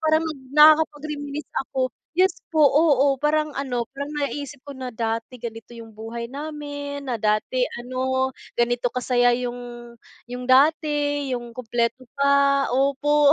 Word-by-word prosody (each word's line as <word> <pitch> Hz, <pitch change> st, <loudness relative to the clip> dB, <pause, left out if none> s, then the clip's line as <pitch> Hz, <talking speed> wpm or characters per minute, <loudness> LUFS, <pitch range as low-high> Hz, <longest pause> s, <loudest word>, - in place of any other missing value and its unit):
parang 315 Hz, 0 st, +2 dB
nag 310 Hz, -4 st, -5 dB, 0.2 s
nakakapag-reminisce 300 Hz, -1 st, +3 dB, 0.2 s
ako. 255 Hz, -2 st, -1 dB, 0.2 s
Yes 365 Hz, +2 st, +2 dB, 0.2 s
po, 315 Hz, -, +2 dB
oo, 285 Hz, -2 st, +4 dB
parang 300 Hz, +1 st, 0 dB
ano, 245 Hz, -4 st, -2 dB
parang 280 Hz, +2 st, -6 dB
naiisip 285 Hz, -1 st, -4 dB
ko 280 Hz, -, -7 dB
na 255 Hz, -2 st, -6 dB
dati 225 Hz, +2 st, -3 dB
ganito 225 Hz, 0 st, -8 dB
yung 225 Hz, -2 st, -11 dB
buhay 235 Hz, +2 st, -6 dB
namin, 285 Hz, 0 st, -6 dB
na 245 Hz, -, 0 dB
dati 215 Hz, +4 st, +1 dB, 0.2 s
ano 260 Hz, +1 st, -1 dB, 0.2 s
ganito 240 Hz, 0 st, 0 dB
kasaya 245 Hz, -1 st, +2 dB
yung 245 Hz, 0 st, -2 dB, 0.7 s
yung 250 Hz, 0 st, -6 dB
dati, 290 Hz, +1 st, +2 dB
yung 240 Hz, -1 st, -5 dB
kumpleto 240 Hz, +1 st, -1 dB
pa, 280 Hz, 0 st, +3 dB
opo. 280 Hz, +3 st, +3 dB
270 Hz, 135 wpm, -23 LUFS, 245-290 Hz, 0.7 s, oo